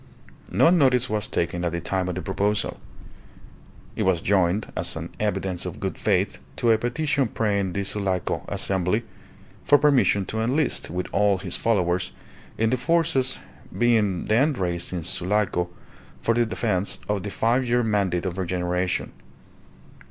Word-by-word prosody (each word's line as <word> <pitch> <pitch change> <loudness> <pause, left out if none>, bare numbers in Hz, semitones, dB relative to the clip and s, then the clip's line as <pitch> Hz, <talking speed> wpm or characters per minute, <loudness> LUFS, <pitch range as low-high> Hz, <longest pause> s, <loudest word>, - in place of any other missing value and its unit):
No 165 - +5
notice 130 -8 +3
was 105 0 0
taken 85 -1 -2
at 85 -1 -1
the 85 - -1
time 90 +1 -1
of 90 - -3
the 90 - -4
proposal. 100 +2 -1 1.2
It - - -3
was 95 -3 +2
joined, 95 +2 +1
as 85 +1 -1
an 85 +2 -5
evidence 95 -4 -1
of - - -6
good - - -3
faith, - - +1 0.2
to 115 - +2
a 110 - +3
petition 135 +2 0
praying 100 -4 -1
the 100 - -1
Sulaco 95 -2 -1
Assembly 95 +4 0 0.6
for 145 - +6
permission 135 -9 +3
to 110 +3 -3
enlist, 130 +4 +1
with 90 +2 -3
all 100 -1 +3
his 95 -2 -3
followers, 90 -5 0 0.4
in 110 0 +1
the 130 - +2
forces 160 -3 +1 0.4
being 110 -6 +2
then 135 +8 +3
raised 85 -6 -2
in 90 -3 -3
Sulaco 90 0 0 0.5
for 115 - +1
the 120 0 +2
defence 105 -4 -1
of 105 -2 0
the 100 - -5
Five 120 +5 +1
Year 120 +1 +3
Mandate 100 -5 0
of 90 0 -3
regeneration. 90 0 -1
100 Hz, 155 wpm, -24 LUFS, 90-115 Hz, 1.2 s, for